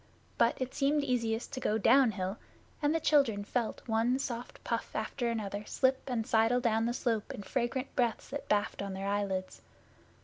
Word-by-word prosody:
But 235 0 +3
it 260 0 -3
seemed 285 +1 +2
easiest 235 -2 -1
to 260 - -3
go 220 -3 +1
downhill, 215 -5 +3 0.4
and 295 +2 +2
the - - +2
children 275 -10 +3
felt 230 +3 -3
one 230 +3 +2
soft 245 -3 -5
puff 230 -1 -3
after 235 +3 -1
another 210 -3 -3
slip 265 0 +2
and 230 -3 -1
sidle 225 +3 +3
down 225 -2 +1
the - - +1
slope 230 -4 -1
in 205 - -7
fragrant 240 +7 -2
breaths 240 -3 0
that 285 +1 -6
baffed 205 -1 +1
on 200 -1 -4
their 190 +1 -4
eyelids. 200 -2 -2
230 Hz, 175 wpm, -31 LUFS, 210-260 Hz, 0.4 s, But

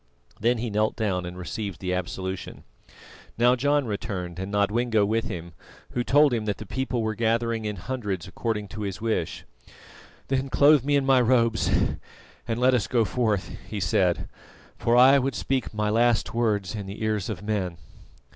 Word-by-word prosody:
Then 120 +3 +2
he 115 0 -3
knelt 105 +1 +1
down 95 -6 -1
and 90 +1 -8
received 90 +2 -5
the 90 -1 -2
absolution. 95 +1 -4 0.7
Now 120 +2 +5
John 145 +2 +1
returned 100 -6 -4
and 95 +1 -4
Nodwengo 105 +1 +2
with 115 +2 0
him, 85 -3 -6 0.4
who 120 - -1
told 145 +1 +4
him 110 -2 -1
that 105 -2 -1
the 110 - -8
people 125 +1 -2
were 110 0 -1
gathering 115 0 0
in 105 -1 -2
hundreds 100 -4 -4
according 105 +1 -3
to 105 - -7
his 100 -1 -4
wish. 110 -7 -2 0.8
"Then 135 0 -1
clothe 145 0 +5
me 145 +1 +2
in 140 -1 +2
my 135 -2 +5
robes 115 -2 +2 0.8
and 115 0 -1
let 130 +1 +4
us 120 -5 +1
go 115 -3 +2
forth," 105 -5 0 0.2
he 105 - -4
said, 90 0 +1 0.5
"for 115 - +1
I 135 +3 +7
would 135 -1 -1
speak 130 +1 -1
my 105 0 -1
last 120 +1 +2
words 110 -5 0
in 105 -3 -5
the 100 +3 -6
ears 110 -2 -1
of 100 -3 -5
men." 100 -5 -2
110 Hz, 175 wpm, -25 LUFS, 100-120 Hz, 0.8 s, I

